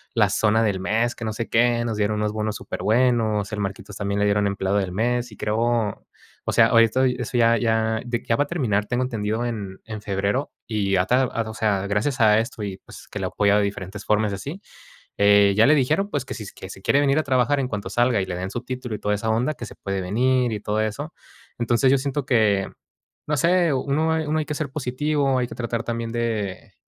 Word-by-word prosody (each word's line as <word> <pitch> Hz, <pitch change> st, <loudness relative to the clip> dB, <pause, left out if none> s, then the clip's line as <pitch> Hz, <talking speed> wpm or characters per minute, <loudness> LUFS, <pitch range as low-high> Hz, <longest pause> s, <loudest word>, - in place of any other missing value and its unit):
la -, -, +4 dB
zona 110 Hz, +1 st, +2 dB
del 100 Hz, -4 st, 0 dB
mes, 110 Hz, +6 st, 0 dB
que 115 Hz, -, -6 dB
no 110 Hz, -, -2 dB
sé 115 Hz, +1 st, -4 dB
qué. 120 Hz, 0 st, +3 dB
Nos 110 Hz, -2 st, -2 dB
dieron 105 Hz, 0 st, 0 dB
unos 105 Hz, 0 st, 0 dB
bonos 110 Hz, -1 st, -2 dB
superbuenos. 110 Hz, -3 st, +1 dB
El 105 Hz, -, -3 dB
Marquitos, 100 Hz, 0 st, -5 dB
también 100 Hz, 0 st, -2 dB
le 105 Hz, -, +2 dB
dieron 105 Hz, 0 st, +2 dB
empleado 100 Hz, 0 st, 0 dB
del 95 Hz, -3 st, -1 dB
mes, 120 Hz, +3 st, 0 dB
y 105 Hz, -, -13 dB
creo, 105 Hz, 0 st, -1 dB, 0.9 s
o -, -, 0 dB
sea, 115 Hz, -1 st, +6 dB
ahorita 115 Hz, +2 st, +4 dB
eso, 125 Hz, -1 st, -2 dB
ya 115 Hz, 0 st, +4 dB
ya, 110 Hz, -1 st, +1 dB
de 120 Hz, -1 st, -2 dB
que -, -, -25 dB
ya 115 Hz, -, +4 dB
va 145 Hz, -, +2 dB
a -, -, -15 dB
terminar, 110 Hz, -12 st, 0 dB
tengo 125 Hz, +1 st, 0 dB
entendido, 110 Hz, -2 st, -2 dB
en 100 Hz, -5 st, -5 dB
en 110 Hz, -2 st, -7 dB
febrero, 100 Hz, +7 st, -1 dB, 0.2 s
y 105 Hz, -3 st, -1 dB
ya 90 Hz, -1 st, +3 dB
ta 125 Hz, +5 st, +3 dB
ah, 115 Hz, -1 st, -2 dB
o -, -, -6 dB
sea, 100 Hz, -3 st, 0 dB
gracias 115 Hz, +6 st, 0 dB
a 105 Hz, -1 st, +6 dB
esto, 115 Hz, -1 st, -4 dB
y 100 Hz, -2 st, -4 dB
pues, -, -, -12 dB
que -, -, -6 dB
lo -, -, -1 dB
ha -, -, -5 dB
apoyado 105 Hz, 0 st, +3 dB
de 100 Hz, -, +2 dB
diferentes 100 Hz, 0 st, -6 dB
formas, 105 Hz, 0 st, +2 dB
y 100 Hz, -, -2 dB
así, 145 Hz, -, -7 dB, 0.6 s
eh, 100 Hz, 0 st, +5 dB
ya 110 Hz, -, +6 dB
le 150 Hz, -, +6 dB
dijeron, 155 Hz, +9 st, +1 dB
pues, 140 Hz, -3 st, -2 dB
que -, -, -6 dB
si 110 Hz, -, -7 dB
s 100 Hz, -, -10 dB
que 95 Hz, -, -9 dB
si 95 Hz, -, -10 dB
quiere 140 Hz, -, +3 dB
venir 140 Hz, 0 st, +2 dB
a 155 Hz, -, 0 dB
trabajar 130 Hz, +1 st, +2 dB
en 130 Hz, -, -1 dB
cuanto 100 Hz, -4 st, -4 dB
salga, 120 Hz, 0 st, +2 dB
y 95 Hz, -, -3 dB
le 90 Hz, -, -3 dB
den 95 Hz, +1 st, -4 dB
su 120 Hz, -, -4 dB
título, 125 Hz, -2 st, -5 dB
y -, -, -7 dB
toda 105 Hz, 0 st, 0 dB
esa 110 Hz, +2 st, -3 dB
onda, 120 Hz, +7 st, +1 dB
que 120 Hz, -, -7 dB
se -, -, -10 dB
puede 100 Hz, -1 st, -4 dB
venir, 125 Hz, +6 st, +1 dB
y 105 Hz, -, -3 dB
todo 105 Hz, +1 st, -2 dB
eso. 135 Hz, +9 st, -3 dB, 0.5 s
Entonces, 120 Hz, +2 st, +2 dB
yo 140 Hz, -, +5 dB
siento 140 Hz, +1 st, -2 dB
que, 105 Hz, -6 st, +2 dB, 0.6 s
no 150 Hz, 0 st, 0 dB
sé, 170 Hz, 0 st, +3 dB
uno 145 Hz, +4 st, 0 dB
hay 160 Hz, -1 st, -1 dB
uno 155 Hz, +1 st, 0 dB
hay 155 Hz, -, -2 dB
que 150 Hz, -, -4 dB
ser 140 Hz, -3 st, -3 dB
positivo, 140 Hz, 0 st, 0 dB
hay 125 Hz, -, -1 dB
que -, -, -9 dB
tratar 115 Hz, -1 st, -3 dB
también 115 Hz, -1 st, -3 dB
de, 110 Hz, -5 st, -3 dB
115 Hz, 250 wpm, -23 LUFS, 105-130 Hz, 0.9 s, sea